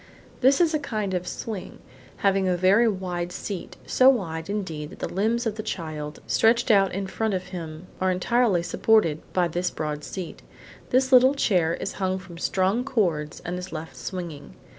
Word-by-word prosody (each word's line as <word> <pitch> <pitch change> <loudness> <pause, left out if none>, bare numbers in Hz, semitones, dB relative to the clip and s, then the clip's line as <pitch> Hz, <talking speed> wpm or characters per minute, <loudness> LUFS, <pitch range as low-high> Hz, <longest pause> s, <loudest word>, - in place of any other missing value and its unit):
This 270 +2 +4
is 340 -2 +3
a 310 - +2
kind 215 -8 -3
of 180 0 -2
swing, 215 -1 -6 0.5
having 195 -1 +3
a 180 -1 +1
very 195 +6 +5
wide 180 -4 -2
seat, 190 0 -6
so 260 +1 +5
wide, 165 -9 -1
indeed, 165 -8 -3
that - - -12
the - - -3
limbs 225 +6 +1
of 220 -1 -2
the - - -2
child 155 -6 -5
stretched 235 +1 +3
out 195 -2 +4
in 195 +1 -3
front 215 +1 -1
of 185 0 -5
him 165 -2 -7 0.2
are 185 - +3
entirely 190 0 +2
supported 175 -6 +2
by 180 -2 +2
this 175 +2 -1
broad 150 -1 -4
seat. 180 0 -6 0.5
This 260 +1 +2
little 260 +2 +7
chair 175 - +2
is 195 - -4
hung 190 0 +1
from 180 -3 -11
strong 190 +7 +1
cords 175 - -1
and 180 +1 -3
is 180 +1 -8
left 160 0 -7
swinging. 170 - -7
190 Hz, 185 wpm, -25 LUFS, 170-220 Hz, 0.5 s, little